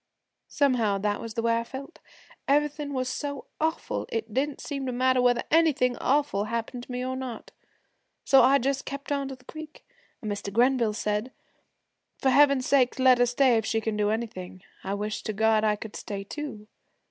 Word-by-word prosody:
Somehow 240 -8 +2
that 205 +1 -1
was 230 -1 -7
the 230 - -1
way 230 0 +2
I - - -3
felt. 275 +6 -9 0.5
Everything 295 +1 +1
was 255 -2 -2
so 285 +1 -4
awful 320 +1 -2
it 225 -1 -4
didn't 280 +3 -1
seem 275 -2 -4
to - - -1
matter 255 +1 +2
whether 245 -1 +3
anything 295 -6 +3
awful 275 -7 +1
happened 235 +2 -4
to - - -11
me 250 0 -3
or 260 0 -2
not. 255 -4 -6 0.7
So 270 - +6
I 275 +2 +6
just 275 +1 -1
kept 280 +1 -7
on 280 -1 0
to 270 - -6
the 250 0 -24
creek, 310 +2 -10 0.3
and 215 - -4
Mr. 205 0 -4
Grenville 240 0 +3
said, 210 +3 -2 0.9
"For 265 - +2
Heaven's 280 -1 +5
sake, 260 -3 +3
let 260 -1 +5
her 245 - +4
stay 245 0 +3
if 220 - -1
she 225 - +1
can 220 -1 -2
do 210 0 +1
anything. 195 -5 -4 0.2
I 195 +1 -2
wish 210 +1 -3
to 215 - -4
God 220 +1 +3
I 210 -1 +3
could 210 0 -9
stay 200 -1 -5
too." 220 -2 -7
250 Hz, 195 wpm, -27 LUFS, 220-275 Hz, 0.9 s, So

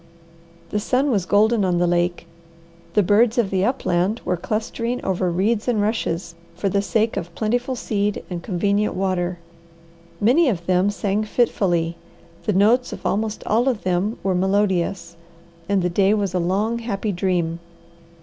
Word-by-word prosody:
The 210 - 0
sun 260 +6 +1
was 195 -6 0
golden 215 +2 +3
on 180 -2 +1
the 175 - +2
lake, 175 0 0 0.7
the 210 - +5
birds 220 +5 +3
of 225 -5 +1
the 190 -1 +1
upland 205 -3 0
were 180 - +1
clustering 230 +6 -3
over 185 -1 0
reeds 205 +6 0
and 235 -4 +1
rushes, 190 -5 -1 0.2
for 195 +3 -1
the 200 +1 +1
sake 220 +2 0
of 170 0 -5
plentiful 245 +4 -1
seed 205 -3 -2
and 175 -2 -5
convenient 200 +3 0
water. 180 -2 -1 0.8
Many 260 +9 +4
of 175 -7 -3
them 185 +2 +2
sang 205 0 -1
fitfully, 175 -7 0 0.5
the 210 - +1
notes 225 +6 +3
of - - -8
almost 215 +1 -1
all 235 +5 +2
of 235 -5 -3
them 185 +5 0
were 190 - +1
melodious, 185 -2 0 0.5
and 200 -2 +2
the - - +2
day 195 +3 +3
was 200 -3 -1
a 180 - +1
long, 205 +7 0
happy 215 -2 -2
dream. 175 -3 -1
200 Hz, 160 wpm, -22 LUFS, 180-220 Hz, 0.8 s, the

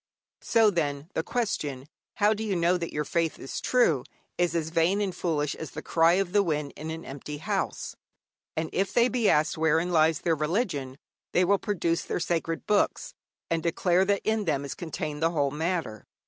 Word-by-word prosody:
So, 225 -2 +4
then, 150 -2 -2
the - - 0
question, 155 - -2 0.3
How 210 0 +4
do 220 +1 -4
you 205 -3 -1
know 170 +1 +3
that 170 -2 -3
your 150 - -1
faith 165 0 0
is 135 - -6
true? 170 - +3 0.3
is 175 -1 0
as 160 -1 -1
vain 170 +4 +2
and 200 -3 -1
foolish 150 -5 -1
as 160 - -7
the 155 - -8
cry 165 +1 +4
of 190 -1 +1
the 205 - +5
wind 150 -6 -2
in 155 +1 -6
an 165 +1 -6
empty 145 +2 -7
house. 145 - -3 0.6
And 160 0 -2
if 195 +1 0
they 240 +1 +5
be 240 -4 +2
asked 150 +1 +2
wherein 160 +2 +2
lies 160 -2 +3
their 170 - +2
religion, 150 - -1 0.4
they 180 - +4
will 200 +2 +3
produce 170 -5 0
their - - -3
sacred 165 -1 -2
books, 210 -1 +1 0.4
and 165 -1 +1
declare 175 +2 +2
that 200 0 +1
in 220 -1 +1
them 140 -4 0
is 140 - -4
contained 155 -3 -5
the 165 - +3
whole 145 -4 0
matter. 160 - -3
165 Hz, 195 wpm, -27 LUFS, 150-190 Hz, 0.6 s, the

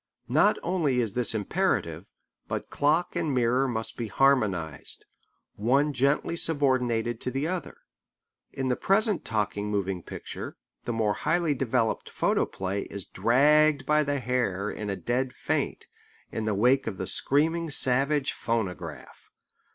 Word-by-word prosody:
Not - - +4
only 165 -8 +1
is 115 -5 -1
this 120 -2 +2
imperative, 105 -3 -1 0.4
but - - -4
clock 155 +6 +1
and 165 -3 0
mirror 125 +2 +2
must 115 -3 -4
be 115 - -3
harmonized, 100 - 0 0.5
one 140 +7 +2
gently 140 +5 +1
subordinated 125 -8 +1
to - - -1
the 135 +4 -2
other. 180 -1 -4 0.7
Both - - -27
cannot - - -21
rule. - - -2
In - - 0
the 125 - +2
present 205 0 +1
talking 105 -1 -1
moving 95 -3 -1
picture - - -7 0.3
the - - -1
more 110 -2 +1
highly 170 -2 +1
developed 115 -4 -1
photoplay 95 +1 -1
is 100 -2 -6
dragged 150 +3 +3
by 150 0 +3
the 145 -1 -1
hair 115 -6 -1
in 105 -1 -5
a 100 - -1
dead 125 +4 -2
faint, - - -2 0.5
in 110 - -3
the 110 -2 0
wake 125 +6 +3
of 100 -4 -3
the 95 - -3
screaming 160 - +1
savage 140 +1 +3
phonograph. 110 -5 -4
125 Hz, 150 wpm, -27 LUFS, 110-145 Hz, 0.7 s, Not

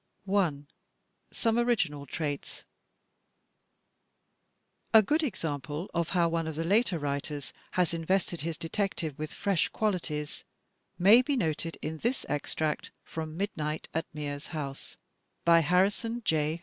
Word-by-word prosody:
I, 180 -8 +2 0.7
Some 230 0 +1
Original 175 -13 +1
Traits 145 0 -4 2.3
A 220 - +10
good 305 +10 +2
example 150 - -3
of 170 -1 0
how 175 -2 +3
one 165 -1 0
of 160 - -3
the 165 - -1
later 200 +1 +3
writers 145 0 -3 0.2
has 180 -2 +2
invested 175 0 0
his 160 0 -3
detective 165 -4 -2
with 155 0 -3
fresh 195 -4 +1
qualities 165 -8 -2 0.5
may 205 +7 +8
be 280 +3 0
noted 165 -4 -1
in 160 0 -3
this 240 - -1
extract 150 +1 -1
from 160 0 -5
"Midnight 155 -6 -2
at 160 +1 -1
Mears 145 -1 -5
House," 140 -4 -6 0.5
by 170 0 +7
Harrison 200 +8 +2
J. 155 +1 +1
165 Hz, 125 wpm, -30 LUFS, 150-195 Hz, 2.3 s, A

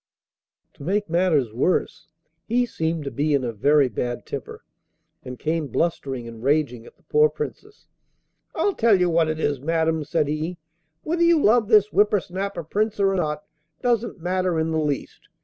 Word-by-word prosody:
To - - -13
make 200 +2 -1
matters 165 -10 +2
worse, 135 +10 0 0.4
he 245 +2 +2
seemed 160 -7 -2
to 140 - -5
be 145 +1 +1
in 135 - 0
a 120 -2 -3
very 140 +6 +3
bad 120 +1 -4
temper, - - -7 0.6
and 125 0 -8
came 155 +1 -1
blustering 135 -7 -2
and 115 -1 -10
raging 135 -4 0
at - - -17
the - - -32
poor 150 0 +3
Princess. 280 - -7 0.7
'I 405 - +1
tell 220 -4 +5
you 180 -1 +2
what 165 -1 +2
it 155 0 -2
is, 145 -4 -1
madam,' 160 +1 0
said 150 0 0
he: 155 +4 -3 0.5
'whether 340 +2 -1
you 340 -1 +5
love 230 -4 +4
this 210 -2 +4
whipper 205 0 +4
snapper 190 0 -5
Prince 210 +6 -1
or 195 -1 +3
not 150 -5 -1 0.4
doesn't 240 -4 0
matter 180 0 0
in 160 0 0
the 160 - 0
least. 145 -3 -4
160 Hz, 175 wpm, -23 LUFS, 145-200 Hz, 0.7 s, tell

